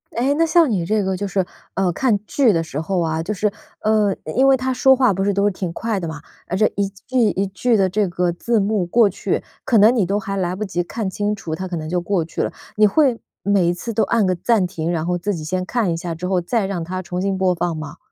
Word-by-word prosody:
哎， 260 +4 +2
那 330 - +4
像 325 -3 +4
你 175 -5 0
这 210 +1 +1
个 190 -1 -1
就 200 +1 -3
是， 190 -1 0 0.3
呃， 185 -2 +1
看 225 +2 +1
剧 245 -2 +3
的 165 -1 +1
时 150 -2 -5
候 180 +3 -1
啊， 160 -1 -1
就 210 +6 -3
是， 210 +1 0 0.3
呃， 215 -2 +2
因 155 - -6
因 270 +1 +5
为 270 - +6
他 260 0 -1
说 265 +1 +5
话 250 -6 +3
不 195 +1 -1
是 200 0 +1
都 200 +1 +1
是 205 - +3
挺 180 -2 -4
快 225 -1 -2
的 170 - -4
嘛， 160 -1 -6 0.3
啊， 185 - -2
这 215 +2 +3
一 200 -1 +1
句 200 +6 -6
一 195 +1 -1
句 225 +5 +1
的 195 -3 +3
这 205 +1 +1
个 175 0 0
字 225 +6 0
幕 200 -2 0
过 215 +3 +4
去， 195 - -2 0.2
可 230 - +3
能 215 +4 +6
你 205 -6 +2
都 200 +3 0
还 195 0 -4
来 180 -1 -1
不 215 - -4
及 175 -3 -2
看 200 +3 -4
清 205 +2 -1
楚， 160 -5 -6
它 185 +2 -5
可 180 - -4
能 155 -1 -5
就 180 0 0
过 175 -1 0
去 165 - -4
了。 - - -1 0.3
你 210 0 +6
会 260 0 +2 0.2
每 195 -3 +2
一 175 - +2
次 230 +6 -5
都 220 - +2
按 230 -3 +2
个 185 - +2
暂 205 +1 +2
停， 170 -2 -3
然 165 -1 -1
后 175 0 0
自 195 +2 -2
己 155 - -6
先 185 +3 -2
看 220 -5 0
一 165 - -1
下 170 -1 -4
之 175 - -6
后 185 -1 +1
再 205 +4 0
让 190 -3 -3
它 185 +2 -4
重 180 0 -4
新 195 -1 0
播 185 -1 +2
放 170 -1 -1
吗？ 155 -2 -7
195 Hz, 300 characters per minute, -20 LUFS, 175-215 Hz, 0.3 s, 为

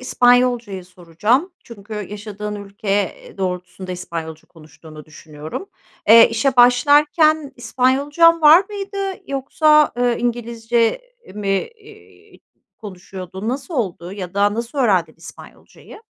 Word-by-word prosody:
İspanyolcayı 245 -6 +1
soracağım. 185 - -1
Çünkü 215 -2 -11
yaşadığın 210 0 -7
ülke, 200 0 -10
eee, 200 0 -2
doğrultusunda 185 0 -5
İspanyolca 165 -3 -7
konuştuğunu 155 -1 -15
düşünüyorum. 155 - -10 0.4
Eee, 230 +2 +8
işe 250 +3 0
başlarken 295 +4 +4
İspanyolcan 285 +7 +2
var 320 +6 +7
mıydı? 395 -1 -4
Yoksa, 300 +3 +2
eee, 245 -1 +1
İngilizce 235 - -1 0.3
mi, 205 -1 -5
eee, 430 - -7 0.4
konuşuyordun, 190 0 -8
nasıl 275 +6 -5
oldu 185 -7 -4
ya 190 -2 -8
da 205 +1 +2
nasıl 235 +5 -5
öğrendin 200 -10 +1
İspanyolcayı? 445 - -15
230 Hz, 110 wpm, -19 LUFS, 190-275 Hz, 0.4 s, Eee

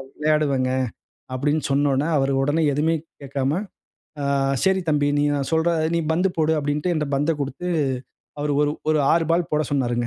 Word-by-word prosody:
விளையாடுவேங்க. 150 -4 +1 0.6
அப்பிடின்னு 145 +4 0
சொன்னவுன்னே, 140 +1 +2
அவரு 135 0 +1
உடனே 145 +4 +1
எதுவுமே 155 +4 +1 0.3
கேட்காம, 135 0 -1 0.7
"ஆ - - -1 0.4
சரி 190 0 +3
தம்பி! 145 -1 +2
நீ - - +2
நான் 140 -2 -2
சொல்ற, 160 +1 +2 0.2
நீ - - +2
பந்து 180 +4 +2
போடு!" 160 0 +2
அப்பிடின்டு 150 +4 -1
என்ட்ட 155 -3 -1
பந்த 145 +4 +1
கொடுத்து, 140 +6 -4 0.7
அவரு 145 0 0
ஒரு 145 - +2 0.2
ஒரு 155 - +3
6 165 0 +3
பால் 170 0 +2
போட 150 0 +2
சொன்னாருங்க. 120 -3 0
145 Hz, 160 wpm, -23 LUFS, 140-160 Hz, 0.7 s, சரி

